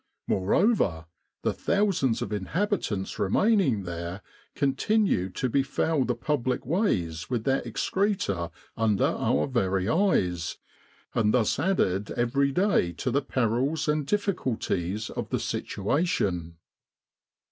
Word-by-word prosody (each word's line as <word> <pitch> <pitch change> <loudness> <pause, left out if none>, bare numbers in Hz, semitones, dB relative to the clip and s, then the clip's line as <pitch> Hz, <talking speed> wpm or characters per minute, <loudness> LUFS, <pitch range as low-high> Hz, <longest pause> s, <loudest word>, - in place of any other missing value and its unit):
Moreover, 95 - +2 0.4
the - - +1
thousands 190 - +1
of 105 - -5
inhabitants 105 - -2
remaining 135 - +2
there 85 +2 -5 0.3
continued 140 - +1
to 130 - 0
befoul 135 +2 +1
the 125 - 0
public 130 -5 -1
ways 90 - 0
with 120 -3 -1
their 135 +1 +1
excreta 185 - -1 0.3
under 110 -3 +2
our 75 - +1
very 95 -7 0
eyes, 90 - +1 0.6
and 110 0 +2
thus 120 0 +2
added 105 - +1
every 140 +4 +2
day 180 - +2
to 125 +9 -2
the 140 +4 +2
perils 135 +5 0
and 150 -1 0
difficulties 115 - -1
of - - -5
the - - 0
situation. 100 - -1
125 Hz, 115 wpm, -27 LUFS, -, 0.6 s, Moreover